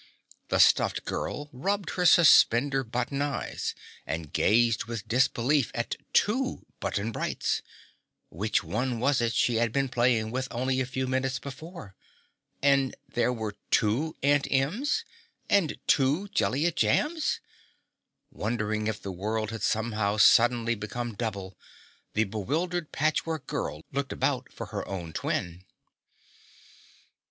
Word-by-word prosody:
The - - +1
stuffed - - +4
girl 145 - -3
rubbed 195 +8 -2
her 180 -1 +2
suspender 135 -5 +6
button 125 +4 -2
eyes 145 -1 -3 0.3
and 80 -2 -5
gazed 115 -1 +3
with 115 -3 -6
disbelief 130 +3 +2
at 120 - -2 0.2
two 255 +5 +1
Button 105 +3 -2
Brights - - -1 0.7
which 105 +1 0
one 125 +1 -2
was 135 +1 +2
it 115 -1 +1
she 120 -2 +2
had 115 0 +1
been 135 +2 0
playing 120 -3 +1
with 130 +2 -2
only 130 +2 -1
a 130 - -2
few 130 0 -2
minutes 130 0 -1
before? 140 - -9 0.7
And 140 -2 +3
there 120 +1 +1
were 110 -4 -4
two 125 +9 +1
Aunt 145 0 +3
Ems 210 - 0 0.4
and 195 -7 +2
two 145 +9 +2
Jellia 165 -4 +1
Jambs! 300 - +1 0.9
Wondering 110 -1 -2
if 110 -1 -2
the 100 - -4
world 110 +4 -2
had 115 -2 -6
somehow 110 -2 0
suddenly 115 +2 +5
become 115 +2 -5
double, 100 -4 -4 0.6
the 110 - +4
bewildered 155 - -2
Patchwork 155 +1 -1
Girl 75 +1 -4
looked 140 0 -2
about 130 -2 -1
for 115 - -7
her 100 - -2
own 85 -4 -5
twin. 85 +1 -3
125 Hz, 130 wpm, -28 LUFS, 110-145 Hz, 0.9 s, suspender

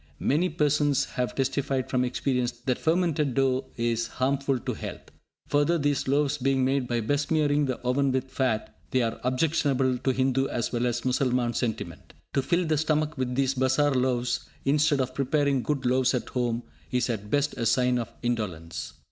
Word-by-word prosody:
Many 160 - +1
persons 145 -3 +2
have 125 -1 -3
testified 135 -1 -1
from 125 -1 +1
experience 125 0 0
that 125 -2 0
fermented 160 -5 +1
dough 135 -1 +2
is 115 -1 0
harmful 135 +1 0
to - - -3
health. - - -8 0.4
Further, 145 +4 +3
these 145 -3 0
loaves 145 +1 +1
being 135 0 +2
made 135 -1 +1
by 120 -1 0
besmearing 145 +3 +1
the 130 - -1
oven 130 +2 +1
with 130 0 -2
fat, 120 -5 -1
they 130 -1 +2
are 115 0 -2
objectionable 130 -1 +1
to 130 - -1
Hindu 130 +1 +1
as 120 - -2
well 120 0 0
as 120 0 -1
Mussalman 125 -2 +1
sentiment. 115 -3 -4 0.2
To 135 - +2
fill 175 +6 +1
the 155 -2 +1
stomach 155 0 0
with 125 -2 -2
these 135 0 +2
bazar 130 +2 +2
loaves 125 -2 0 0.2
instead 145 0 +3
of 130 0 -3
preparing 140 0 +1
good 140 0 -2
loaves 130 +1 +3
at 125 - -3
home 120 -1 -1 0.3
is 125 -1 0
at 105 -4 -4
best 145 +4 +1
a 115 - -1
sign 125 +2 +2
of 115 - -5
indolence. 95 -9 -3
130 Hz, 175 wpm, -27 LUFS, 125-145 Hz, 0.4 s, Further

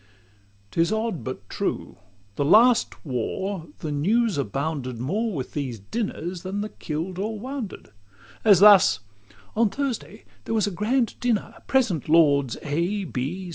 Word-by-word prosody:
'T 165 - +1
is 170 - +2
odd, 220 -5 -1
but 130 -6 -6
true, - - -3 0.4
last 220 - +4
war 165 - -3
the 155 - -3
News 210 +9 +2
abounded 140 0 -3
More 205 - -1
with 135 -9 -4
these 135 -6 -3
dinners 175 - -4
than 195 +2 -3
the 210 - -4
kill'd 170 +3 -5
or 215 +2 -2
wounded; 255 -3 -6
LIV - - -31 0.5
As 200 -5 +7
thus: 195 - +7 0.6
"On 225 0 +3
Thursday 245 -4 -4 0.2
there 225 - -1
was 215 - +2
a 205 - -2
grand 230 +6 0
dinner; 240 -4 0
Present, 225 - +1
Lords 145 -5 +4
A. 175 +7 -1
185 Hz, 140 wpm, -24 LUFS, 145-220 Hz, 0.6 s, As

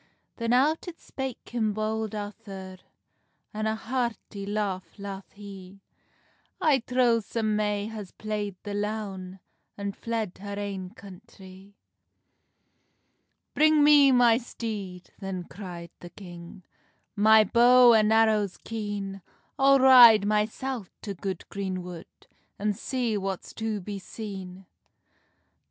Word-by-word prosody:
Then 230 -1 -1
out 290 +8 +2
it 340 -1 -8
spake 265 -2 -7
him 220 -3 0
Bold 215 0 -2
Arthur, 195 -2 -8 0.7
An 215 +1 -2
a 220 - 0
hearty 230 -4 -4
laugh 200 -4 -3
laugh 200 -1 -7
he: 195 -2 -11 0.8
"I 305 -7 +3
trow 245 -1 +2
some 215 0 -2
may 210 -1 0
has 215 -4 -7
playd 210 -2 -4
the 205 - -5
loun, 200 -3 -4 0.4
And 200 0 -4
fled 225 -5 -4
her 200 0 -6
ain 195 -2 -4
country." 195 -2 -14 1.8
"Bring 310 0 +4
me 290 -2 +7
my 240 -2 +5
steed," 205 -7 -7
then 195 -2 -5
cry'd 175 -3 -9
the 175 - -10
king, 175 0 -11 0.5
"My 220 +1 +6
bow 240 +3 +6
and 215 -1 +4
arrows 215 -3 +3
keen; 205 -3 -5 0.4
I'll 275 0 +6
ride 245 -6 +8
mysel 215 +2 -1 0.2
to 200 - -4
good 190 -1 -5
green 190 -2 -4
wood, 175 -2 -9 0.5
An 210 +1 0
see 235 0 -2
what's 195 -1 -5
to 220 -2 -3
be 200 +1 -6
seen." 190 -2 -8
210 Hz, 120 wpm, -27 LUFS, 195-230 Hz, 1.8 s, ride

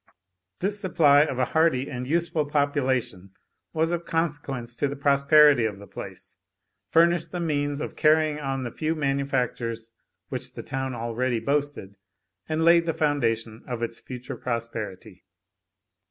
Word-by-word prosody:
This 200 +2 -1
supply 150 -7 +5
of 135 - -4
a 130 - +2
hardy 160 -3 +2
and 125 -1 -5
useful 165 -1 0
population 130 -10 -1 0.4
was 160 +1 0
of 170 0 -2
consequence 145 -8 -3
to 145 - +1
the 140 - -4
prosperity 140 -1 +5
of 105 -3 -2
the 100 - -11
place, - - -9 0.5
furnished 170 0 +3
the 180 - -3
means 145 -3 -1
of - - -5
carrying 155 -1 +3
on 135 -2 -3
the 120 - -4
few 160 +1 -2
manufactures 130 -5 -2 0.4
which - - -5
the - - -6
town 130 -1 -3
already 120 +1 -1
boasted, 140 -6 -2 0.5
and 155 +1 0
laid 170 0 +5
the 165 - 0
foundation 115 -7 0
of 120 -2 -4
its 115 0 -4
future 125 -1 -7
prosperity. 115 -6 -5
140 Hz, 145 wpm, -25 LUFS, 120-155 Hz, 0.5 s, supply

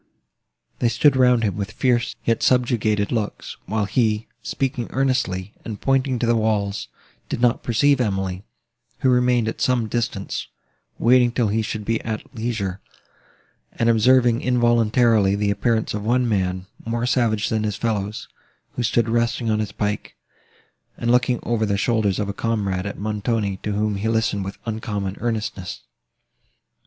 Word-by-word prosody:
They 120 - +2
stood 130 +5 +4
round 125 -2 +4
him 100 -5 0
with 100 0 -4
fierce, 125 -1 +1
yet 115 -1 +1
subjugated, 115 -5 +2
looks, 110 -4 -3
while 110 -1 0
he, 110 0 +1 0.2
speaking 125 -3 -2
earnestly, 120 -8 -1
and 110 -3 -6
pointing 135 -1 +1
to 120 - 0
the 115 0 +3
walls, 105 -2 0 0.4
did - - -2
not 120 -1 +2
perceive 130 +3 +2
Emily, 95 -4 -2 0.6
who 130 -3 +4
remained 125 -2 +3
at 115 - -4
some 125 -3 +2
distance, 115 -3 -3 0.5
waiting 125 0 +4
till 120 -3 +1
he 110 +2 +1
should 105 -1 -4
be 115 +1 0
at 110 -1 -5
leisure, 110 -5 -3 0.9
and 115 - +1
observing 120 +1 +4
involuntarily 120 -4 +3
the 100 0 +1
appearance 110 +2 0
of 105 - -3
one 125 +3 +2
man, 95 -4 -1 0.2
more 115 +1 -2
savage 115 -5 +1
than 110 -1 0
his 105 -2 -1
fellows, 105 -2 -2 0.4
who - - -4
stood 115 -1 +1
resting 115 0 0
on 110 - +1
his 110 - -2
pike, 105 0 -3 0.8
and 120 - 0
looking, 125 0 +3
over 115 -2 0
the 100 -2 +1
shoulders 105 -3 +1
of 105 - -1
a 100 - -3
comrade, 100 -4 -1
at 100 - -6
Montoni, 105 -1 -1
to 105 +2 -4
whom 105 0 0
he 105 +3 -2
listened 110 -3 0
with 95 - -6
uncommon 105 -3 -3
earnestness. 110 -6 -3
110 Hz, 155 wpm, -22 LUFS, 105-120 Hz, 0.9 s, stood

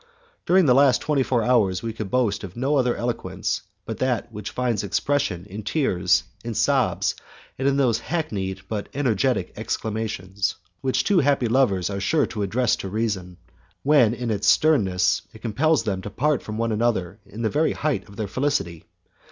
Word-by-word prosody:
During 185 0 +5
the 130 - +5
last 135 -1 +5
twenty 150 -3 +1
four 125 -3 +1
hours 105 -7 +2
we 115 -1 -3
could 110 -3 -5
boast 115 -4 +1
of 95 -2 -8
no 135 +4 +1
other 125 -3 +2
eloquence 100 -5 -2 0.2
but 115 - -5
that 125 -2 -1
which 105 -2 -6
finds 120 -5 -1
expression 100 -2 -1
in 105 +1 -7
tears, 95 - +1 0.2
in 115 -1 -4
sobs, - - +2 0.5
and 135 - +1
in 140 0 +2
those 120 -5 +2
hackneyed 100 - -3
but 105 -1 -4
energetic 125 -9 0
exclamations, 105 -3 -3 0.3
which 130 -1 +1
two 200 -3 +3
happy 140 -4 +2
lovers 110 -7 +2
are 100 0 -3
sure 145 +9 +2
to 105 - -5
address 110 +4 +1
to 95 - -5
reason, 95 -4 -2 0.5
when 135 -6 +4
in 120 -2 -3
its 100 -1 -1
sternness 95 - +3
it 110 - -15
compels 140 +7 +2
them 100 -4 -2
to 105 - -6
part 140 +6 0
from 110 0 -6
one 115 0 0
another 105 -4 0
in 115 +3 -7
the 110 - +2
very 155 +2 +2
height 130 -10 -2
of 100 - -13
their 105 0 -3
felicity. 100 - -1
115 Hz, 180 wpm, -24 LUFS, 100-130 Hz, 0.5 s, During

